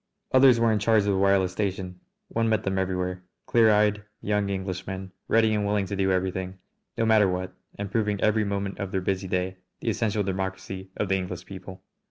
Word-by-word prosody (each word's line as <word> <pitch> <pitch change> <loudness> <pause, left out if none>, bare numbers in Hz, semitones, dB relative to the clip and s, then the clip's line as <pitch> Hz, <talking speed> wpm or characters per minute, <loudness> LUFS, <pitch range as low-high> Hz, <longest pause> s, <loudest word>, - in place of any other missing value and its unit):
Others 130 -2 +6
were 115 -1 +4
in 110 - +2
charge 110 +1 +4
of 100 - +1
the - - +1
wireless 95 -1 +3
station. 95 -2 -3 0.3
One 115 0 0
met 110 -1 +1
them 95 -1 0
everywhere, 90 -1 -2 0.2
clear 115 -2 +4
eyed 105 0 +3 0.2
young 105 -1 0
Englishmen 95 0 -4 0.2
ready 110 -1 +3
and 105 -1 +1
willing 100 -1 +1
to 100 - -4
do 95 -1 +1
anything, 95 0 -1 0.4
no 115 - +2
matter 110 -2 +5
what, 90 0 -3 0.2
and 100 -1 -5
proving 105 -2 0
every 110 +1 +2
moment 100 -1 -3
of 100 -2 -4
their 95 - 0
busy 95 +1 -1
day 95 +1 -1 0.2
the 115 - -2
essential 105 -1 0
democracy 95 0 -4
of 105 - 0
the 95 - +3
English 90 -1 -5
people. 95 -1 -10
100 Hz, 200 wpm, -26 LUFS, 95-105 Hz, 0.4 s, Others